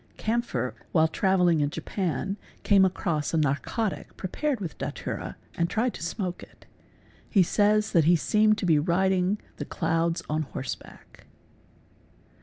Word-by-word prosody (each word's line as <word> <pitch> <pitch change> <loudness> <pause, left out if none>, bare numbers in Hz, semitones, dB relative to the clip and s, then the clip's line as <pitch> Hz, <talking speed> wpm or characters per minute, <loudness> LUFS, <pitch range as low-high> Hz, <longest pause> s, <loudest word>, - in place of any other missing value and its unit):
Kampfer, 225 - -1 0.2
while 160 -1 +5
traveling 180 -2 +2
in 145 - +1
Japan, 185 +4 -2 0.3
cami 195 -2 +5
across 165 -4 -1
a - - +2
narcotic 155 - -1
prepared 260 +8 -2
with 175 -6 -5
datwra - - -4 0.2
and 170 0 0
tried 235 +2 0
to - - -9
smoke 180 +1 -3
it. - - -15 0.7
Hen 195 -4 +5 0.5
that 165 -5 +5
he 175 +2 +6
seemed 215 +5 +3
to 200 - -2
be 160 -4 +4
riding 185 +4 +2 0.2
the - - -4
clouds 165 0 0
on 155 +1 0
horseback. 135 -3 -8
180 Hz, 135 wpm, -27 LUFS, 160-200 Hz, 0.7 s, he